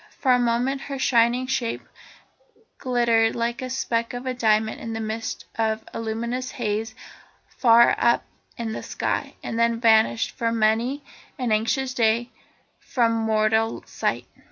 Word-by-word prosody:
For 260 Hz, -, +2 dB
a 250 Hz, -, +5 dB
moment 245 Hz, +3 st, 0 dB
her 275 Hz, 0 st, -5 dB
shining 240 Hz, 0 st, +2 dB
shape 255 Hz, -3 st, -2 dB, 1.0 s
glittered 235 Hz, -3 st, +2 dB
like 235 Hz, +1 st, -2 dB
a 255 Hz, -, -4 dB
speck 245 Hz, -3 st, -2 dB
of 245 Hz, +1 st, -6 dB
diamond 220 Hz, -1 st, +1 dB
in 230 Hz, -, -5 dB
the 225 Hz, -, -3 dB
midst 220 Hz, +1 st, -4 dB
of 220 Hz, 0 st, 0 dB
the -, -, -4 dB
luminous 235 Hz, +3 st, -3 dB
haze 220 Hz, -1 st, -3 dB, 0.5 s
far 235 Hz, -1 st, +5 dB
up 235 Hz, 0 st, +3 dB, 0.3 s
in 230 Hz, -2 st, -3 dB
the -, -, -5 dB
sky, -, -, -3 dB
and 225 Hz, -, -3 dB
then 235 Hz, 0 st, +3 dB
it -, -, -4 dB
vanished 225 Hz, -1 st, +3 dB
for 230 Hz, -1 st, -2 dB
many 230 Hz, +5 st, +1 dB, 0.3 s
an 250 Hz, -3 st, -2 dB
anxious 235 Hz, +5 st, 0 dB
day 235 Hz, 0 st, +1 dB, 0.5 s
from 235 Hz, -3 st, +1 dB
mortal 220 Hz, 0 st, +1 dB
sight. -, -, -2 dB
230 Hz, 150 wpm, -24 LUFS, 225-245 Hz, 1.0 s, a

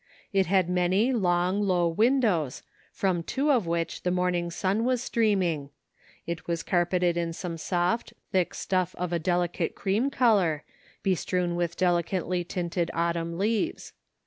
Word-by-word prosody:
It 195 Hz, -1 st, +3 dB
had 185 Hz, -1 st, +3 dB
many 185 Hz, +7 st, +2 dB
long, 180 Hz, -2 st, +1 dB
low 180 Hz, -4 st, +2 dB
windows, 205 Hz, -, +1 dB, 0.3 s
from 185 Hz, -3 st, 0 dB
two 275 Hz, -, 0 dB
of 235 Hz, -10 st, +2 dB
which 170 Hz, 0 st, -2 dB
the 180 Hz, -, 0 dB
morning 180 Hz, -1 st, 0 dB
sun 190 Hz, +5 st, 0 dB
was 250 Hz, 0 st, +1 dB
streaming; 185 Hz, -12 st, +1 dB, 0.6 s
it 170 Hz, 0 st, -5 dB
was 170 Hz, -1 st, -1 dB
carpeted 175 Hz, -1 st, +1 dB
in 170 Hz, -1 st, -1 dB
some 170 Hz, 0 st, -5 dB
soft, 175 Hz, +6 st, -1 dB, 0.2 s
thick 185 Hz, -3 st, +1 dB
stuff 185 Hz, -2 st, -1 dB
of 180 Hz, -1 st, -2 dB
a 170 Hz, -, +1 dB
delicate 175 Hz, +1 st, 0 dB
cream 210 Hz, +7 st, 0 dB
color, 200 Hz, -, +2 dB, 0.4 s
bestrewn 180 Hz, -1 st, 0 dB
with 175 Hz, -1 st, -2 dB
delicately 180 Hz, 0 st, 0 dB
tinted 175 Hz, 0 st, -2 dB
autumn 170 Hz, 0 st, -1 dB
leaves. 220 Hz, -, -1 dB
180 Hz, 145 wpm, -27 LUFS, 170-195 Hz, 0.6 s, It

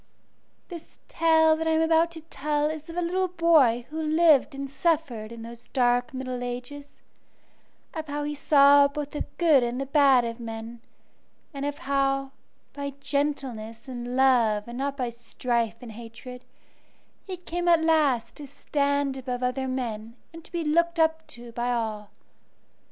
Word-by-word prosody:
This 340 Hz, -3 st, -10 dB
tale 320 Hz, -1 st, +4 dB
that 320 Hz, +1 st, -3 dB
I 320 Hz, -, +2 dB
am 320 Hz, -, +2 dB
about 325 Hz, +1 st, +3 dB
to 325 Hz, -, -9 dB
tell 300 Hz, -1 st, -2 dB
is 315 Hz, 0 st, -8 dB
of 330 Hz, -, -8 dB
a 350 Hz, -, 0 dB
little 370 Hz, +2 st, 0 dB
boy 320 Hz, -10 st, +3 dB
who 320 Hz, +1 st, -3 dB
lived 310 Hz, -3 st, +3 dB
and 275 Hz, 0 st, -5 dB
suffered 275 Hz, -6 st, -1 dB
in 230 Hz, -1 st, -9 dB
those 235 Hz, +1 st, -11 dB
dark 245 Hz, +1 st, +2 dB
middle 255 Hz, -2 st, -5 dB
ages; 250 Hz, +4 st, -6 dB, 1.1 s
of 315 Hz, -1 st, -5 dB
how 290 Hz, 0 st, -3 dB
he 295 Hz, 0 st, -3 dB
saw 285 Hz, -1 st, +6 dB
both 290 Hz, 0 st, -5 dB
the 295 Hz, -, -4 dB
good 320 Hz, -6 st, +5 dB
and 240 Hz, +1 st, -2 dB
the 275 Hz, -, -2 dB
bad 275 Hz, -3 st, +4 dB
of 230 Hz, +1 st, -5 dB
men, 225 Hz, 0 st, -7 dB, 0.7 s
and 280 Hz, 0 st, -3 dB
of 290 Hz, -, -4 dB
how, 275 Hz, 0 st, 0 dB, 0.4 s
by 280 Hz, -1 st, -5 dB
gentleness 275 Hz, -5 st, -3 dB
and 245 Hz, -1 st, -5 dB
love 235 Hz, -6 st, +3 dB
and 240 Hz, +1 st, -7 dB
not 280 Hz, 0 st, -2 dB
by 250 Hz, -3 st, -2 dB
strife 235 Hz, -1 st, -2 dB
and 240 Hz, -2 st, -9 dB
hatred, 235 Hz, +3 st, -11 dB, 0.8 s
he 375 Hz, -2 st, -6 dB
came 350 Hz, 0 st, -4 dB
at 335 Hz, -2 st, +5 dB
last 295 Hz, -8 st, +2 dB
to 290 Hz, -, -9 dB
stand 280 Hz, 0 st, -1 dB
above 250 Hz, -1 st, -4 dB
other 260 Hz, +1 st, -1 dB
men 230 Hz, -3 st, -4 dB, 0.2 s
and 330 Hz, 0 st, -11 dB
to -, -, -18 dB
be 345 Hz, -1 st, -2 dB
looked 335 Hz, +2 st, +1 dB
up 320 Hz, 0 st, +1 dB
to 240 Hz, 0 st, -12 dB
by 240 Hz, +1 st, -2 dB
all. 215 Hz, -3 st, -3 dB
275 Hz, 170 wpm, -26 LUFS, 245-315 Hz, 1.1 s, saw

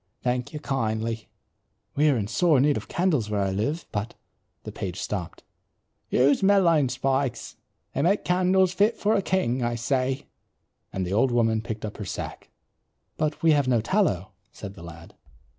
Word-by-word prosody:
Thank 125 Hz, 0 st, -1 dB
you 150 Hz, -, -6 dB
kindly." 115 Hz, -5 st, -2 dB, 0.7 s
"We 150 Hz, +2 st, +4 dB
are 135 Hz, -, +2 dB
in 105 Hz, -, -1 dB
sore 160 Hz, -, +3 dB
need 145 Hz, +2 st, +3 dB
of -, -, -5 dB
candles 155 Hz, -, 0 dB
where 105 Hz, -1 st, 0 dB
I 95 Hz, -, 0 dB
live, 115 Hz, -, -2 dB
but 105 Hz, +3 st, -3 dB, 0.2 s
" -, -, -48 dB
the -, -, -7 dB
page 95 Hz, 0 st, -5 dB
stopped. 95 Hz, -5 st, -5 dB, 0.7 s
"Use 140 Hz, +3 st, +3 dB
mullein 175 Hz, -8 st, +4 dB
spikes. 135 Hz, 0 st, -1 dB, 0.4 s
They 140 Hz, -, -1 dB
make 195 Hz, +7 st, +2 dB
candles 185 Hz, +1 st, +3 dB
fit 205 Hz, +5 st, +2 dB
for 210 Hz, +1 st, +1 dB
a 205 Hz, -, +2 dB
king, 160 Hz, -11 st, 0 dB
I 120 Hz, 0 st, 0 dB
say," 130 Hz, +2 st, -1 dB, 0.7 s
and 95 Hz, -1 st, -2 dB
the 90 Hz, -, -3 dB
old 115 Hz, +6 st, +3 dB
woman 115 Hz, -2 st, +2 dB
picked 110 Hz, -1 st, -5 dB
up 105 Hz, -, -7 dB
her 105 Hz, -, -5 dB
sack. -, -, -6 dB, 0.7 s
"But 155 Hz, 0 st, -2 dB
we 165 Hz, -, +6 dB
have 145 Hz, -3 st, +3 dB
no 125 Hz, -2 st, +3 dB
tallow," 115 Hz, -, 0 dB, 0.2 s
said 100 Hz, -2 st, -8 dB
the 95 Hz, -, -13 dB
lad. 85 Hz, 0 st, -11 dB
130 Hz, 175 wpm, -25 LUFS, 110-160 Hz, 0.7 s, we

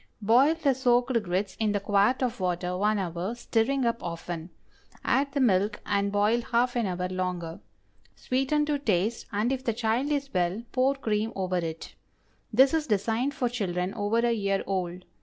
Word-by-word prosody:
Boil 255 Hz, +9 st, +5 dB
the 300 Hz, -4 st, +2 dB
soaked 245 Hz, -1 st, +2 dB
grits 190 Hz, +1 st, -2 dB
in 215 Hz, -2 st, +1 dB
the 205 Hz, -, +1 dB
quart 205 Hz, +6 st, +2 dB
of 245 Hz, -3 st, -2 dB
water 180 Hz, 0 st, -1 dB
one 210 Hz, +3 st, +1 dB
hour, 180 Hz, +3 st, -3 dB
stirring 240 Hz, +3 st, 0 dB
up 235 Hz, 0 st, 0 dB
often; 170 Hz, 0 st, -5 dB, 0.6 s
add 280 Hz, +1 st, +2 dB
the 285 Hz, -, 0 dB
milk 205 Hz, -4 st, +2 dB
and 200 Hz, 0 st, 0 dB
boil 210 Hz, +4 st, +2 dB
half 245 Hz, +1 st, 0 dB
an 235 Hz, -4 st, +1 dB
hour 180 Hz, 0 st, -2 dB
longer. 180 Hz, -2 st, -3 dB, 0.6 s
Sweeten 270 Hz, +4 st, 0 dB
to 295 Hz, -1 st, 0 dB
taste, 215 Hz, -2 st, 0 dB
and 215 Hz, +4 st, 0 dB
if 260 Hz, -1 st, -2 dB
the 230 Hz, -, 0 dB
child 235 Hz, +5 st, 0 dB
is 280 Hz, -1 st, -2 dB
well, 180 Hz, +4 st, 0 dB
pour 265 Hz, +2 st, +2 dB
cream 220 Hz, -4 st, -1 dB
over 185 Hz, -1 st, -1 dB
it. 165 Hz, -2 st, -5 dB, 0.6 s
This 265 Hz, +5 st, +5 dB
is 315 Hz, -2 st, 0 dB
designed 225 Hz, +6 st, 0 dB
for 250 Hz, -, 0 dB
children 190 Hz, -6 st, -2 dB
over 205 Hz, +2 st, 0 dB
a 235 Hz, 0 st, +2 dB
year 200 Hz, -3 st, 0 dB
old. 180 Hz, -2 st, -3 dB
215 Hz, 175 wpm, -27 LUFS, 185-250 Hz, 0.6 s, Boil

